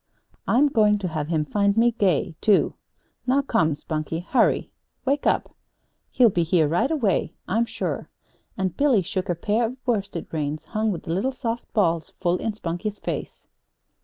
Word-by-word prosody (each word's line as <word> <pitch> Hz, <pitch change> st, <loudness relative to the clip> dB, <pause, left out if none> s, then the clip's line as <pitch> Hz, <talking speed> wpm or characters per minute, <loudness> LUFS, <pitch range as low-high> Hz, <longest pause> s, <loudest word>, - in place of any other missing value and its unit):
I'm 270 Hz, +6 st, +4 dB
going 210 Hz, -5 st, +4 dB
to 195 Hz, -3 st, -3 dB
have 155 Hz, -2 st, -3 dB
him 155 Hz, -2 st, 0 dB
find 200 Hz, +5 st, +1 dB
me 235 Hz, +1 st, +5 dB
gay, 185 Hz, -6 st, +1 dB
too. 210 Hz, -3 st, +3 dB, 0.5 s
Now, 275 Hz, +2 st, +3 dB
come, 160 Hz, -, +2 dB
Spunkie; 155 Hz, +2 st, -4 dB
hurry 260 Hz, -, +2 dB, 0.3 s
wake 280 Hz, +2 st, +1 dB
up! -, -, 0 dB, 0.5 s
He'll 240 Hz, -4 st, +4 dB
be 175 Hz, -, +1 dB
here 165 Hz, -1 st, +3 dB
right 175 Hz, -, +1 dB
away, 220 Hz, -, 0 dB
I'm 230 Hz, +4 st, +1 dB
sure." -, -, -4 dB, 0.5 s
And 185 Hz, -2 st, -1 dB
Billy 265 Hz, -7 st, +3 dB
shook 185 Hz, +1 st, -3 dB
a 175 Hz, -, +1 dB
pair 210 Hz, +7 st, 0 dB
of 240 Hz, +3 st, -2 dB
worsted 200 Hz, -8 st, -1 dB
reins, 155 Hz, -1 st, -3 dB
hung 215 Hz, 0 st, -1 dB
with 175 Hz, -, -5 dB
little 195 Hz, +11 st, 0 dB
soft 240 Hz, -3 st, -4 dB
balls, 170 Hz, -6 st, +1 dB
full 180 Hz, -1 st, +1 dB
in 225 Hz, -, -2 dB
Spunkie's 205 Hz, +2 st, -4 dB
face. -, -, -5 dB
200 Hz, 165 wpm, -24 LUFS, 165-230 Hz, 0.5 s, me